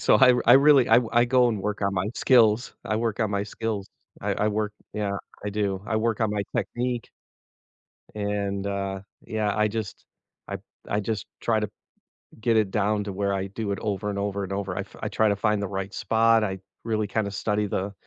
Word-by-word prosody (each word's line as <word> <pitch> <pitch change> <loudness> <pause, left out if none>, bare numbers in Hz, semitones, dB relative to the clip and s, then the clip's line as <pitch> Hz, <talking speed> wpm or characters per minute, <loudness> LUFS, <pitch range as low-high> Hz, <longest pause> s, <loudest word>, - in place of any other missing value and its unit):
so, - - +5
I 130 -2 +7
r 125 - +1
I 120 - +8
really 140 -1 +7
I 115 - +7
w 120 -2 +2
I 120 +1 +5
go, 125 0 +4
and 105 -4 -2
work 105 0 -2
on 100 -1 0
my 95 +2 0
skills 115 -2 +4
I 110 - 0
work 115 -1 -1
on 110 -2 +1
my 100 -1 0
skills, 105 -1 -4 0.3
I - - -1
I 105 - +1
work 105 0 -1 0.2
yeah, 100 -2 -2 0.3
I - - -1
do, 100 -2 -1
I 110 - 0
work 110 0 0
on 110 - +2
my 105 -1 -1
technique 120 +3 -2 1.1
and 100 -1 -2
uh, 100 -1 -2 0.3
yeah, 105 -2 -1
I 105 0 +3
just 105 -2 -5 0.4
I - - -4 0.3
I 105 - +1
just 105 0 -3 0.2
try 110 -2 +2
to 105 - -2 0.7
get 115 0 +2
it 105 -3 +2
down 105 0 +1
to 100 -1 -5
where 100 +1 0
I 95 0 -1
do 100 +1 -4
it 100 - -2
over, 105 -1 -2
and 100 - -3
over, 100 0 -2
and 95 - -6
over, 95 -2 -3
I - - 0
f - - -12
I - - -2
try 110 -1 +2
to 100 - +2
find 105 0 +1
the 100 - -1
right 95 0 -4
spot. 115 +1 +3
I 95 -2 -2 0.2
really 110 -2 0
kind 105 0 -1
of 100 - -6
study 105 0 0
the 100 +1 -2
105 Hz, 225 wpm, -26 LUFS, 100-110 Hz, 1.1 s, I